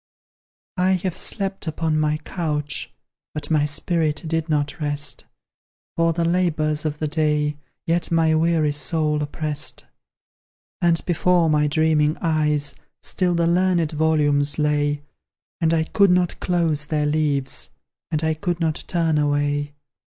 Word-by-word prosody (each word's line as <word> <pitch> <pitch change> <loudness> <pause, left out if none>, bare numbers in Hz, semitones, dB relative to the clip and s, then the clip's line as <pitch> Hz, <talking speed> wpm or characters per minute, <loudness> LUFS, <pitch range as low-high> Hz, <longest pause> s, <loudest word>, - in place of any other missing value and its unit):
I 185 +1 +3
have 185 -1 -2
slept 195 -4 -2
upon 160 0 0
my 155 0 +1
couch, 150 -3 -3 0.4
But 150 - -4
my 150 -1 +3
spirit 155 +1 0
did 165 0 -2
not 145 -1 -1
rest, 145 0 -1 0.7
For 165 0 +2
the 165 +1 -1
labours 160 -3 +1
of 150 -1 -2
the 155 - -2
day 150 -1 0 0.3
Yet 170 +1 +1
my 165 -1 +3
weary 160 -1 +2
soul 150 0 0
opprest; 150 0 -2 1.0
And 170 -2 +2
before 175 -1 +2
my 150 0 +3
dreaming 155 0 +2
eyes 150 -3 +1 0.3
Still 180 -2 0
the 170 0 +2
learned 175 -2 +2
volumes 150 -2 +2
lay, 145 -1 0 0.6
And 165 -1 +2
I 165 -1 +2
could 200 +4 +3
not 180 -1 +1
close 165 -4 0
their 150 -1 0
leaves, 145 -3 -1 0.4
And 155 -1 -1
I 160 0 +2
could 175 +2 -3
not 160 -2 -1
turn 165 -3 +1
away. 145 0 0
155 Hz, 140 wpm, -22 LUFS, 150-170 Hz, 1.0 s, I